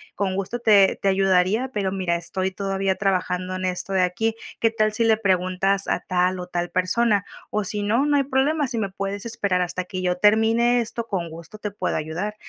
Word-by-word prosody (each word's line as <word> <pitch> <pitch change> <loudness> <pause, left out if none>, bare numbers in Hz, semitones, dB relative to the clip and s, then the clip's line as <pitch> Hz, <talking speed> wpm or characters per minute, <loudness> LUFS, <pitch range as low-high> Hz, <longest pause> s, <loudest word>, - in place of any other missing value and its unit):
con 190 -2 -1
gusto 195 +5 -3
te 205 -4 +4
te 200 - 0
ayudaría, 195 +6 +2
pero 195 -2 -1
mira, 185 -3 -1
estoy 185 +3 -2
todavía 195 0 -1
trabajando 185 -1 -1
en 185 0 -3
esto 180 +1 -3
de 185 -1 +3
aquí. 220 +5 0 0.2
¿Qué 225 - +3
tal 215 -1 +1
si 230 - +1
le 220 -1 +4
preguntas 195 0 +1
a - - 0
tal 180 0 0
o 180 - -5
tal 175 -1 -2
persona? 200 +3 +1 0.3
O, 210 - 0
si 205 +2 -1
no, 230 +7 +2
no 290 -1 +3
hay 275 - +3
problema. 280 +2 +1
Si 240 -2 -4
me 200 -2 -1
puedes 195 +2 -4
esperar 200 -5 0
hasta 180 +1 -4
que 185 0 -5
yo 180 0 0
termine 225 +4 +4
esto, 230 0 -4
con 175 -5 -3
gusto 165 +5 -10
te 210 -1 -4
puedo 185 -2 -2
ayudar". 175 +7 -4
195 Hz, 210 wpm, -23 LUFS, 185-220 Hz, 0.3 s, te